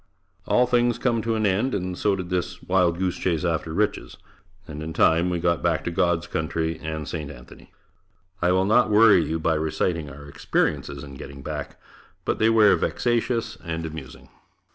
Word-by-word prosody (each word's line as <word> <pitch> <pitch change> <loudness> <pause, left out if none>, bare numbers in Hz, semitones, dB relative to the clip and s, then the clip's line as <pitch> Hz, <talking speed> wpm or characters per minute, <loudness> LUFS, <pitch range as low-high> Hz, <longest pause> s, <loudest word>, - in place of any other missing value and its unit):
All 125 - +4
things 120 -1 +2
come 115 -3 0
to 115 0 -1
an 110 -1 0
end, 105 +7 +1
and 90 -1 -3
so 100 +2 +1
did 90 -1 -6
this 90 0 -3
wild 90 -2 +2
goose 95 0 -1
chase 85 -2 0
after 80 -2 -1
riches 105 +4 -1 0.5
and 75 0 -7
in 80 +1 -5
time 85 +3 +3
we 90 - -1
got 85 0 +1
back 85 -2 0
to 85 - -3
God's 85 -2 +1
country 80 -1 -2
and 80 -2 -4
St. 75 -4 -5
Anthony. - - -13 0.7
I 90 +1 +3
will 95 +1 +2
not 110 +4 +4
worry 105 -4 +6
you 80 +2 -2
by 80 +1 +1
reciting 80 0 -1
our 70 +1 -11
experiences 70 0 -1
in 70 -2 -10
getting 70 0 -10
back, - - -6 0.5
but - - -1
they 110 - +4
were 110 -3 +6
vexatious 115 -1 -1
and 80 0 -4
amusing. 80 -4 -9
85 Hz, 185 wpm, -24 LUFS, 80-105 Hz, 0.7 s, worry